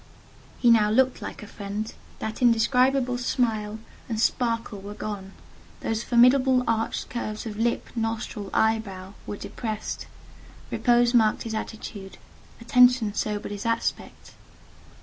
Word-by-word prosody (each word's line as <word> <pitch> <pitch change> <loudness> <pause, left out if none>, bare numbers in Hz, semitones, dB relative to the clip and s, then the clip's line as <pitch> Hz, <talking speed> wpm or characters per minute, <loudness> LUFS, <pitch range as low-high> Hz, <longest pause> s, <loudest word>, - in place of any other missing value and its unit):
He 240 - +5
now 215 -2 +5
looked 255 +3 +2
like - - -7
a - - -9
friend: 205 +1 -5 0.2
that 220 +3 -5
indescribable 250 +2 +3
smile 220 -4 0 0.3
and 220 -2 -2
sparkle 230 -3 0
were 205 +1 -8
gone; 195 -3 -6 0.5
those 220 -1 -1
formidable 250 +2 +4
arched 225 0 -1
curves 215 -3 -4
of 215 -2 -5
lip, 235 +1 0
nostril, 225 -2 -3
eyebrow, 200 -4 0
were 205 - -4
depressed; 220 -1 -5 0.6
repose 240 0 +3
marked 220 -3 +3
his 225 - -5
attitude—attention 225 +2 0
sobered 210 -1 -2
his 205 +2 -4
aspect. 230 0 -3
225 Hz, 120 wpm, -26 LUFS, 210-240 Hz, 0.6 s, He